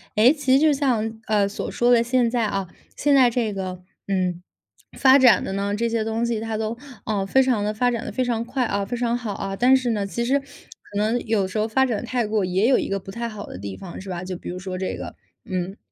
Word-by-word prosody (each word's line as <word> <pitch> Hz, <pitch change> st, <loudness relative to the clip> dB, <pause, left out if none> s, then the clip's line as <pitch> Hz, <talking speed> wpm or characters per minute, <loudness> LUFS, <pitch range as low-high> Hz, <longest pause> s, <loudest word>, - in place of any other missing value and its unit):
哎， 230 Hz, +6 st, +6 dB
其 285 Hz, -4 st, +1 dB
实 -, -, +3 dB
就 305 Hz, -1 st, +4 dB
像， 225 Hz, -6 st, 0 dB
呃， 210 Hz, -2 st, +2 dB
所 200 Hz, -, -5 dB
说 240 Hz, +1 st, +2 dB
的 235 Hz, -1 st, +6 dB
现 240 Hz, 0 st, +2 dB
在 235 Hz, -3 st, +1 dB
啊， 195 Hz, -3 st, -2 dB, 0.3 s
现 290 Hz, -, +2 dB
在 260 Hz, -3 st, +6 dB
这 230 Hz, -3 st, -1 dB
个， 185 Hz, -2 st, -5 dB, 0.2 s
嗯， 185 Hz, -3 st, -1 dB, 0.6 s
发 265 Hz, +1 st, +6 dB
展 255 Hz, -2 st, +6 dB
的 190 Hz, -, -4 dB
呢， 200 Hz, +1 st, -1 dB
这 235 Hz, +2 st, 0 dB
些 225 Hz, -1 st, 0 dB
东 225 Hz, +1 st, -1 dB
西 235 Hz, -2 st, -1 dB
它 220 Hz, 0 st, -3 dB
都， 220 Hz, +1 st, -2 dB, 0.3 s
呃， 205 Hz, -3 st, 0 dB
非 265 Hz, +6 st, +4 dB
常 245 Hz, -5 st, +1 dB
地 210 Hz, -, 0 dB
发 245 Hz, +3 st, +1 dB
展 230 Hz, -2 st, -3 dB
得 -, -, -4 dB
非 255 Hz, +5 st, 0 dB
常 235 Hz, -2 st, -1 dB
快 250 Hz, +1 st, -1 dB
啊、 200 Hz, -2 st, -1 dB
非 245 Hz, +4 st, -4 dB
常 235 Hz, 0 st, 0 dB
好 225 Hz, -4 st, -4 dB
啊， 195 Hz, 0 st, -4 dB
但 255 Hz, +5 st, +5 dB
是 250 Hz, -2 st, -1 dB
呢， 205 Hz, -3 st, -1 dB
其 235 Hz, +4 st, -2 dB
实 275 Hz, +3 st, +2 dB
可 275 Hz, -6 st, -13 dB
能 220 Hz, +4 st, +1 dB
有 210 Hz, -4 st, +1 dB
时 200 Hz, +3 st, -3 dB
候 215 Hz, -, +1 dB
发 265 Hz, +4 st, +2 dB
展 230 Hz, -4 st, -2 dB
太 245 Hz, -1 st, -1 dB
过 210 Hz, -1 st, 0 dB
也 190 Hz, +5 st, +1 dB
有 265 Hz, -, +4 dB
一 -, -, -3 dB
个 195 Hz, 0 st, -1 dB
不 195 Hz, -, -10 dB
太 235 Hz, +3 st, -4 dB
好 210 Hz, -2 st, -7 dB
的 90 Hz, -, -9 dB
地 100 Hz, -1 st, -6 dB
方， 185 Hz, -1 st, -8 dB
是 195 Hz, -, -9 dB
吧， 175 Hz, 0 st, -4 dB
就 185 Hz, 0 st, -5 dB
比 -, -, -8 dB
如 180 Hz, -, -5 dB
说 185 Hz, 0 st, -5 dB
这 185 Hz, 0 st, -3 dB
个 90 Hz, -1 st, -7 dB, 0.3 s
嗯。 185 Hz, +2 st, -3 dB
220 Hz, 285 characters per minute, -23 LUFS, 195-245 Hz, 0.6 s, 哎